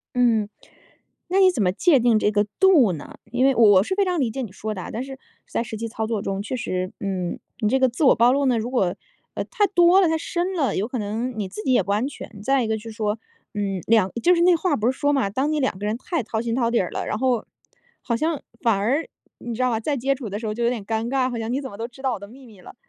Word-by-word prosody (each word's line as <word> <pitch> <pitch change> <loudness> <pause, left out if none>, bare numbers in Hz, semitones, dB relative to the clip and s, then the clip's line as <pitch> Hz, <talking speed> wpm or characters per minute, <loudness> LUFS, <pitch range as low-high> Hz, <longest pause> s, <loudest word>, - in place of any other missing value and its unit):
嗯， 230 -4 +3 0.8
那 375 +3 +2
你 375 -1 +7
怎 250 - -1
么 180 -2 +2
界 285 - +4
定 235 -2 +4
这 210 - +2
个 205 0 +1
度 320 - +5
呢？ 155 -4 -8
因 245 +2 +1
为 270 0 +4
我 205 -5 +6
是 305 - -2
非 400 +1 +2
常 360 -2 -1
理 255 -6 +1
解 265 - -5
你 225 - -6
说 215 +3 -5
的 190 - -6
啊， - - -7
但 235 +4 -4
是 270 0 -9 0.3
在 - - -1
实 225 -1 -6
际 230 +1 -4
操 220 0 -3
作 220 -3 -2
中， 195 0 -3
确 220 +5 -4
实， 185 -5 -3
嗯， 185 -3 -3 0.2
你 215 - +2
这 265 - +2
个 260 0 +4
自 245 +6 -5
我 260 - +7
暴 235 +2 +5
露 280 +1 +1
呢， 250 -2 +3
如 225 +2 -3
果， 195 -9 0 0.4
啊， - - -2
太 435 -5 +1
多 355 0 +5
了， 365 - +4
太 320 - +1
深 350 +3 -2
了， 300 -7 0
有 205 +4 -1
可 255 - -3
能 225 +3 -3
你 200 -3 -2
自 200 +3 -7
己 260 - +1
也 245 - +4
不 200 +2 -2
安 215 +6 0
全， 225 -7 -10
再 270 +2 +2
一 - - -2
个 220 0 0
就 215 - -9
是 225 - -7
说， 215 -1 -2 0.3
嗯， 195 -3 -2
两 215 -4 +3
就 360 - +5
是 340 - +1
那 350 0 +5
话 335 -1 0
不 230 -2 +1
是 260 - -7
说 290 0 +2
嘛， 270 -8 +1
当 265 +9 -1
你 305 - 0
两 260 -8 -1
个 205 - -6
人 215 +2 -1
太 320 +3 -2
掏 220 0 -3
心 230 0 -2
掏 235 -2 +1
底 235 - +2
儿 180 - -2
了， - - -4
然 - - -2
后 250 -2 +1 0.6
好 235 - -1
像 310 +3 -1 0.2
反 230 -3 +3
而 260 +11 0 0.3
你 240 - -6
知 230 - -7
道 255 - +2
吧， 225 - 0
再 285 +5 -1
接 270 +3 +1
触 250 -6 -7
的 205 - -3
时 225 - -5
候 210 - -2
就 235 +2 -2
有 235 - +3
点 235 -5 -4
尴 225 +1 -1
尬， 260 -1 +1
好 240 - -4
像 225 +1 -3
你 265 - 0
怎 270 - -6
么 200 - -10
都 225 +2 -4
知 245 +2 -17
道 265 -2 0
我 - - -5
的 200 - -10
秘 255 +5 -15
密 210 -5 -16
了。 - - -12
235 Hz, 320 characters per minute, -23 LUFS, 215-270 Hz, 0.8 s, 你